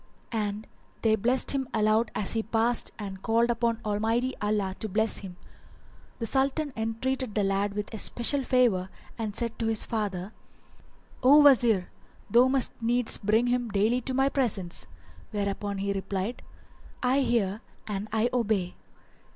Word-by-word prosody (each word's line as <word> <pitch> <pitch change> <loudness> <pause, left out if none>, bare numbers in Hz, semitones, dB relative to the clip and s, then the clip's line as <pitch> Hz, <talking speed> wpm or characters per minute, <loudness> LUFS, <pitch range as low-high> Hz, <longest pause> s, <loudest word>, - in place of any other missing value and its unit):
[FN#388] 225 - -1
And 210 +1 -3 0.4
they 220 -1 +4
blessed 245 +5 +2
him 270 -2 -1
aloud 215 +1 +2
as 205 - 0
he 225 - 0
passed 230 +2 +1
and 195 -3 -7
called 230 +2 +2
upon 235 -1 0
Almighty 225 +5 0
Allah 210 -2 0
to 220 - -4
bless 220 +3 +1
him. 190 -3 -8
[FN#389] 175 - -25
The 230 - -3
Sultan 275 +4 0
entreated 225 +2 -2
the 210 - +2
lad 195 +1 0
with 210 +2 -4
especial 240 +5 +1
favour 240 -8 +2 0.3
and 215 -3 -3
said 235 -1 -1
to 225 - -1
his 220 -1 0
father, 205 -3 -3 0.9
"O 275 +4 +7
Wazir, 235 -9 +4 0.4
thou 245 +2 +6
must 265 -1 0
needs 240 +1 +1
bring 220 +3 +2
him 245 -1 0
daily 215 +5 +1
to 260 +2 -3
my 270 +1 +3
presence;" 205 - 0 0.4
whereupon 200 -1 -3
he 200 +1 -1
replied, 195 +3 -3 0.6
"I 255 +2 +3
hear 225 -5 0 0.2
and 205 0 -4
I 220 +2 +1
obey." 210 -7 0
225 Hz, 155 wpm, -27 LUFS, 205-245 Hz, 0.9 s, O